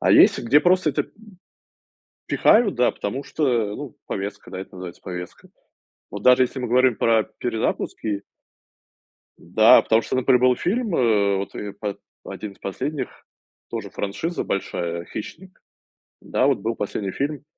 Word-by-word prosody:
А - - +2
есть, - - +7
где 135 +6 +4
просто 180 -2 +3
это, 140 - 0
м, - - -18 1.2
пихают, 220 -2 +4
да, 125 - +3
потому 130 +8 -4
что, 155 - -4 0.3
ну, 140 -2 -8
повестка, 100 +1 -5
да, 95 - -5
это 95 - -9
называется 90 -1 -9
повестка. 90 -1 -8 0.6
Вот 100 0 -7
даже 125 0 +6
если 130 +1 -4
мы 125 - -3
говорим 125 0 +4
про 115 -1 +3
перезапуски 110 -3 -2 1.1
Да, - - +6
потому 110 0 +3
что, - - -2
например, 130 -1 +3
был 125 0 +4
фильм, 215 - -1
э, 105 -5 +3
вот, 100 +1 -4
э, 105 -1 -5
по 100 -1 -5 0.3
1 105 -2 -7
из - - -26
последних, 130 +8 -3 0.6
тоже - - -5
франшиза 160 - -3
большая, 85 -3 -3
"Хищник". 180 - -9 0.6
Да, - - +1
вот - - +2
был 115 +1 -2
последний 100 -1 -3
фильм 140 +4 -3
115 Hz, 155 wpm, -23 LUFS, 100-140 Hz, 1.2 s, есть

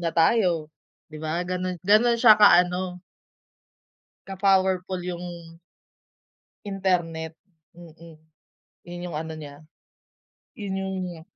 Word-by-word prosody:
na 165 -2 -3
tayo, 165 -3 +2 0.4
di 155 - -9
ba, 160 +3 -2
ganun 185 0 -3
ganun 215 +5 +4
siya 220 -3 +6
ka 180 -4 +7
ano. 180 0 -5 1.3
Ka 195 - -6
powerful 190 -1 +1
yung 175 -1 -5 1.4
internet, 175 -5 -1 0.5
mm, 165 -1 -14 0.7
yun 175 0 -7
yung 150 - -4
ano 160 0 -5
niya, 150 -1 -11 0.9
yun 200 -2 -4
yung 185 -3 -4
180 Hz, 105 wpm, -24 LUFS, 165-190 Hz, 1.4 s, ka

